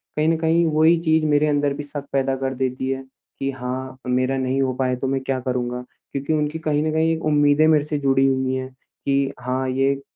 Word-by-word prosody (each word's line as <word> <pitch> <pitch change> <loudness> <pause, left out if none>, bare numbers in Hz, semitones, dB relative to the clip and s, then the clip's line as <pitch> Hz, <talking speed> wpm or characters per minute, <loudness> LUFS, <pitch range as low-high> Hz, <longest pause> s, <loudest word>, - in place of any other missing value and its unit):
कहीं 150 +1 +1
न 165 - +2
कहीं 165 +1 +2
वही 160 +2 +5
चीज़ 160 0 +3
मेरे 150 0 +3
अंदर 145 -1 +1
भी 145 - -5
शक 145 -1 -7
पैदा 135 -1 +1
कर 135 0 -2
देती 130 0 -2
है 135 0 -2 0.4
कि 135 0 -1
हाँ, 130 0 -5
मेरा 130 +1 +1
नहीं 130 +1 0
हो 130 -1 +1
पाए 130 0 0
तो 130 +2 -3
मैं 135 0 0
क्या 130 0 -2
करूँगा। 125 -1 -2 0.3
क्योंकि 140 +3 -2
उनकी 150 +1 -1
कहीं 150 -2 0
न 155 - 0
कहीं 160 +1 +2
उम्मीदें 145 +1 +4
मेरे 155 -2 +4
से 150 0 -2
जुड़ी 135 -1 +3
हुई 130 -1 0
हैं 130 0 -4 0.4
कि 140 0 +1
हाँ, 130 +1 -2
ये 135 +1 +1
135 Hz, 220 wpm, -22 LUFS, 130-150 Hz, 0.4 s, वही